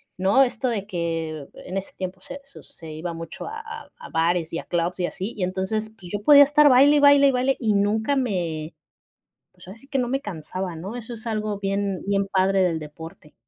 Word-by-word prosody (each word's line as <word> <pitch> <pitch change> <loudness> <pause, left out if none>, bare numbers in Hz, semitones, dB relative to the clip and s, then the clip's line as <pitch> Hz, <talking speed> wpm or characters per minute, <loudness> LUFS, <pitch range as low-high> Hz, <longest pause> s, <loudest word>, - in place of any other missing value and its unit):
¿no? 195 +9 +4
Esto 250 0 -1
de 205 -4 -3
que 165 -5 -3 0.2
en 185 - -6
ese 195 - -5
tiempo 185 0 -5
se 280 - -9
su 275 - -15
se 160 -3 -12
iba 170 +2 -5
mucho 165 0 -8
a 445 +1 -6
a 450 0 -10
a 475 - -10
bares 165 0 0
y 165 - -1
a - - -7
clubs 175 +1 -2
y 175 - +1
así. 195 +6 -5
Y 200 - -3
entonces, 190 +4 -2
pues, 180 -2 -11
yo 205 0 -3
podía 285 +1 +9
estar 290 +1 +5
baile, 280 +3 +6
y - - +4
baile, 285 -1 +7
y - - +4
baile, 260 +1 +1
y 220 -4 +1
nunca 215 +6 +1
me, 175 - -2 0.8
pues, 180 0 -18
ahora 190 +4 -10
sí 275 +4 -20
que 275 -2 -1
no 245 - 0
me 270 +3 -1
cansaba, 180 0 -5
¿no? 190 +8 -7
Eso 240 0 -7
es 230 0 -9
algo 215 -2 -2
bien 195 -1 -1
bien 200 0 +1
padre 190 0 +2
del 170 -3 0
deporte. 155 0 -11
195 Hz, 225 wpm, -24 LUFS, 175-245 Hz, 0.8 s, podía